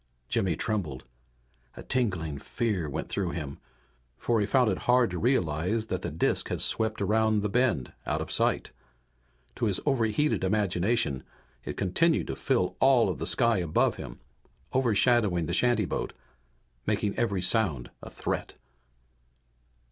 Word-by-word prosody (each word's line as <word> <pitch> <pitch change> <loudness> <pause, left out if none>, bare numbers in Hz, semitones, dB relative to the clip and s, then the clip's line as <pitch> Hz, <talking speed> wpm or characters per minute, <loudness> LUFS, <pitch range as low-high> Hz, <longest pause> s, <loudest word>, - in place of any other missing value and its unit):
Jimmy 90 -4 +1
trembled. 85 - -2 0.7
A - - -8
tingling 90 - -1
fear 100 - -2
went 70 - -4
through 95 -3 -2
him, 70 -4 -5 0.6
for 115 -2 +1
he 100 - 0
found 125 -1 +3
it 95 - -2
hard 125 -4 +4
to 90 - -3
realize 110 - +1
that 95 - -2
the 85 - -3
disk 80 +2 0
had - - -2
swept 110 -1 +1
around 110 -1 +2
the 105 - -1
bend 120 - +1
out - - 0
of - - -5
sight. - - 0 0.9
To 120 - 0
his 100 - +1
overheated 135 -1 +1
imagination 95 - +1 0.4
it - - -6
continued 160 - +2
to - - -4
fill 120 -9 0
all 130 -3 +5
of - - -3
the - - -2
sky 115 -4 +2
above 85 -4 +1
him, - - -8 0.5
overshadowing 115 -7 +3
the 85 - -3
shantyboat, 115 -2 +1 0.7
making 105 -1 0
every 100 -6 0
sound 90 - +1
a - - -9
threat. - - -4
105 Hz, 145 wpm, -28 LUFS, 90-120 Hz, 0.9 s, all